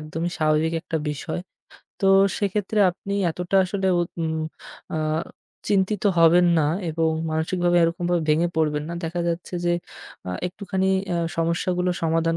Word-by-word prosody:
একদম 155 +1 -5
স্বাভাবিক 155 +1 +2
একটা 160 - -3
বিষয়। 155 +4 -4 0.6
তো 195 - +2 0.3
সেক্ষেত্রে 205 +1 -1
আপনি 200 +3 -6 0.2
এতটা 180 +3 -1
আসলে 190 +1 -2
উ - - +3 0.2
উম 160 0 -1 0.6
আ - - 0 0.7
চিন্তিত 200 0 +1 0.2
হবেন 170 +2 +6
না 150 - +2 0.2
এবং 160 0 +1 0.2
মানসিকভাবে 175 +3 +1
এরকমভাবে 175 0 +1
ভেঙে 165 +3 +3
পড়বেন 150 -2 +1
না। 170 - -4
দেখা 170 +2 -2
যাচ্ছে 170 +2 -4
যে 175 - +2 0.6
আ - - -2 0.2
একটুখানি 190 +1 -2 0.3
আ - - +1 0.2
সমস্যাগুলো 175 +2 0
সমাধান 165 0 +1
170 Hz, 140 wpm, -24 LUFS, 160-185 Hz, 0.7 s, হবেন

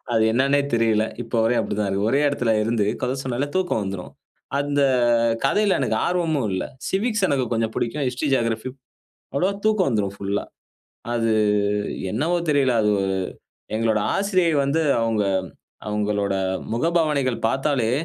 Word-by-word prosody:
அது 110 - +3
என்னானே 140 +3 +3
தெரியல, 110 -2 +2 0.2
இப்ப 115 - -10
வரையும் 120 +1 +2
அப்படித்தான் 105 -1 -2
இருக்கு. 100 +2 0
ஒரே 140 - +3
இடத்தில 125 -5 0
இருந்து 115 -2 +1 0.2
கதை 130 - -1
சொன்னாலே 130 +2 -1
தூக்கம் 180 - 0
வந்துரும். 95 -2 -6 0.5
அந்த 145 0 +1 0.6
கதையில 205 +7 +3
எனக்கு - - 0
ஆர்வமும் 160 -8 0
இல்லை. 95 - -2 0.2
சிவிக்ஸ் 215 +1 0
எனக்கு 135 -3 +1
கொஞ்சம் 115 -1 0
பிடிக்கும், 135 +5 -2
ஹிஸ்டரி, 125 +4 -2
ஜியோகிராபி 115 0 -1 0.7
அவ்வளவா 185 +8 +1
தூக்கம் 215 -6 +3
வந்துரும் 105 -5 -1
ஃபுல்லா. 100 +1 -2 0.7
அது 115 -1 +1 0.8
என்னவோ 160 +10 0
தெரியல, 140 -3 +3
அது 105 - +2 0.9
எங்களுடைய 110 -2 +1
ஆசிரியை 185 -4 +2
வந்து 155 +4 +1 0.2
அவங்க 115 -2 +1 0.7
அவங்களுடைய 105 -2 0 0.3
முகபாவனைகள் 150 -3 +1
பார்த்தாலே, 135 -3 0
125 Hz, 135 wpm, -23 LUFS, 110-150 Hz, 0.9 s, அது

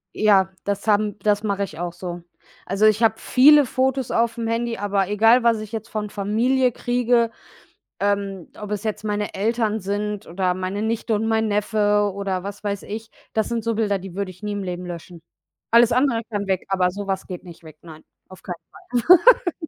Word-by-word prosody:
Ja, 200 -3 +4
das 200 +1 -3
haben 210 -1 +2
das 210 0 +1
mache 200 -2 -1
ich 165 -5 -7
auch 175 -1 -3
so. 175 0 -7 0.4
Also, 195 +3 +1
ich 215 +1 +4
habe 220 -1 +4
viele 290 +5 +6
Fotos 260 0 0
auf'm 230 0 0
Handy, 230 0 -1
aber 200 -1 0
egal, 225 +4 +4
was 230 -2 +3
ich 215 -1 -8
jetzt 220 -1 -5
von 210 -1 -4
Familie 235 +6 +1
kriege, 245 -1 +1 0.7
ähm, 200 -3 -1
ob 210 -1 -7
es 210 -1 -3
jetzt 215 -1 -3
meine 210 -1 -2
Eltern 220 +1 0
sind 205 +1 -3
oder 180 +1 -1
meine 185 +3 -3
Nichte 225 0 -1
und 215 +1 -1
mein 220 0 +1
Neffe 205 0 +1
oder 195 -2 -3
was 200 +1 -7
weiß 200 -1 -3
ich, 220 +2 -7 0.2
das 220 -1 0
sind 235 -2 -2
so 230 0 0
Bilder, 210 -2 0
die 185 -1 -10
würde 200 0 -3
ich 185 +2 -16
nie 210 0 -3
im 205 -1 -3
Leben 180 -1 -5
löschen. 175 -1 -9 0.5
Alles 235 0 +5
andere 250 -2 +2
kann 205 -2 -3
weg, 190 -1 -1
aber 185 -2 +2
so 200 +2 -6
was 190 -1 -3
geht 180 -1 -8
nicht 170 -2 -13
weg. 155 -1 -13
Nein, 160 -2 -12 0.3
auf 185 - -14
keinen 180 - -5 0.9
Fall. 335 -1 -4
205 Hz, 200 wpm, -22 LUFS, 195-225 Hz, 0.9 s, viele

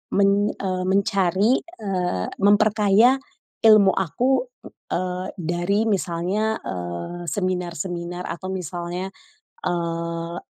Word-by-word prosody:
men 200 +1 +3
eee, 185 -1 -2
mencari, 195 +3 +2
eee, 185 - -2
memperkaya 210 +4 +4 0.4
ilmu 215 -3 +7
aku, 245 +9 +1 0.2
ng - - -10 0.2
eee, 180 +1 -2
dari 175 +4 0
misalnya, 195 +3 0
eee, 90 - -5
seminar-seminar 175 -2 -3
atau 185 +2 -5
misalnya, 180 +1 -4 0.6
eee, 170 0 -2
b - - -10
185 Hz, 95 wpm, -23 LUFS, 175-200 Hz, 0.6 s, ilmu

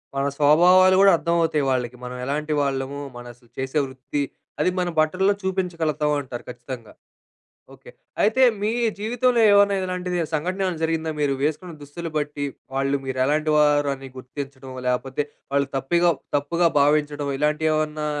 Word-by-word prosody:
మన 135 - 0
స్వభావాలు 180 +6 +6
గూడా 195 0 +7
అర్థమవుతాయి 165 -3 +1
వాళ్ళకి. 125 -1 -1
మనం 125 0 -6
ఎలాంటి 150 +3 -2
వాళ్ళము? 140 0 -2 0.2
మన 120 - -9
అసలు 120 -1 -26
చేసే 135 +3 -1
వృత్తి, 130 +2 -4 0.4
అది - - +3
మన 180 -1 0
బట్టల్లో 185 +6 +2
చూపించగలుగుతాం 170 -6 -1
అంటారు 125 -3 -8
ఖచ్చితంగా. 120 -2 -8 0.8
ఓకె. - - -15 0.3
అయితే 225 +5 +3 0.2
మీ 210 +1 0 0.3
జీవితంలో 240 +2 +1
ఏమైనా 200 0 +5
ఇలాంటిది 180 -1 -3
సంఘటన 180 +5 -1
ఏమైనా 180 -4 -2
జరిగిందా? 160 0 -1
మీరు 140 -2 +1
వేసుకున్న 160 +4 -2
దుస్తులు 165 +3 -7
బట్టి, 145 -1 -2 0.3
వాళ్ళు 135 +1 +1
మీరు 130 -1 -4
ఎలాంటి 155 +2 +1
వారు 145 -1 +3
అని 135 0 -10
గుర్తించడం, 135 0 -8 0.2
లేకపోతే 130 +3 -1 0.3
వాళ్ళు 140 -1 +2
తప్పిగా 170 +6 +2 0.3
తప్పుగా 170 +4 +1
భావించడం 145 0 +1
ఇలాంటివి 150 +1 +1
ఏవన్నా 155 0 -1
150 Hz, 145 wpm, -23 LUFS, 135-175 Hz, 0.8 s, గూడా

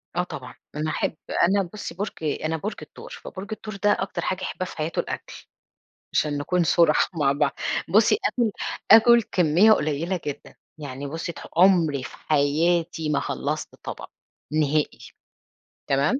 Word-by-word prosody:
آه، 180 - +1
طبعًا، 130 -7 -8 0.2
أنا 155 +1 -1
أحب 155 - -1 0.3
أنا 195 +3 +3
بصي 210 - -6
برج 205 +2 -2
أنا 155 +2 -1
برج 210 +7 -4
الثور، - - -11
فبرج 190 +1 -8
الثور 215 -1 -6
ده 205 +1 +2
أكتر 195 - -3
حاجة 185 0 -2
يحبها 185 - -3
في - - -10
حياته 155 +1 -2
الأكل، - - -5 0.7
عشان 145 -1 +1
نكون 175 +4 +1
صُرحا 165 -1 +4
مع 140 -2 +3
بعض، 145 +1 +1 0.4
بصي 215 - +4
آكل 235 -3 +1 0.4
آكل 235 +2 +8
كمية 180 +3 +4
قليلة 165 +1 0
جدًا 145 0 -6 0.2
يعني 140 -1 -6
بصي 165 +3 -4
ت - - -12 0.2
عمري 170 -7 +4
في - - -9
حياتي 160 +2 +1
ما 150 - +1
خلصت 150 +1 -3
طبق، - - -7 0.4
نهائي، 155 -1 +1 0.9
تمام؟ 140 - +2
165 Hz, 150 wpm, -24 LUFS, 150-190 Hz, 0.9 s, آكل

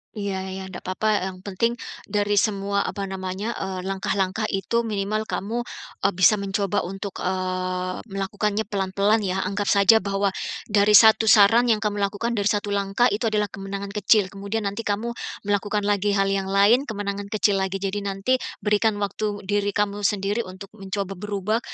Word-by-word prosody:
Iya 200 -2 -3
iya, 190 0 -6
ndak 180 - -9
papa, 210 +3 +1
yang 185 0 -12
penting 230 +5 0 0.3
dari 205 0 +2
semua, 200 -1 0
apa 200 - -4
namanya, 190 +3 -4
eee, 190 -1 -4
langkah-langkah 195 +2 -1
itu 210 +4 0
minimal 215 +1 -2
kamu, 230 +5 -2 0.4
eee, 200 - +2
bisa 190 +3 +5
mencoba 200 0 0
untuk, 195 +1 -6
eee, 185 0 -2
melakukannya 205 +2 -1
pelan-pelan 200 +2 +1
ya. 190 -1 -1
Anggap 200 +1 -2
saja 200 +2 +6
bahwa 200 0 0 0.4
dari 210 0 +5
satu 220 0 +6
saran 225 +4 +6
yang 220 - +4
kamu 205 -1 -1
lakukan, 205 +4 -1
dari 205 -2 0
satu 205 -1 -1
langkah 200 +4 +1
itu 225 +3 0
adalah 210 -1 +1
kemenangan 195 0 -6
kecil, 210 0 +3
kemudian 200 +3 -3
nanti 200 +3 -2
kamu 215 +4 -1 0.3
melakukan 205 0 0
lagi 205 0 +1
hal 195 - +3
yang 195 -1 -1
lain 210 +8 +4
kemenangan 200 -1 -4
kecil 205 -2 +2
lagi. 190 0 -2
Jadi 195 +1 -2
nanti 200 +6 0 0.2
berikan 210 +1 +2
waktu 205 +1 -3
diri 205 0 0
kamu 205 0 0
sendiri 205 +2 -1
untuk 190 +2 -10
mencoba 195 -1 -4
berubah 210 +2 -1
200 Hz, 165 wpm, -24 LUFS, 195-210 Hz, 0.4 s, saja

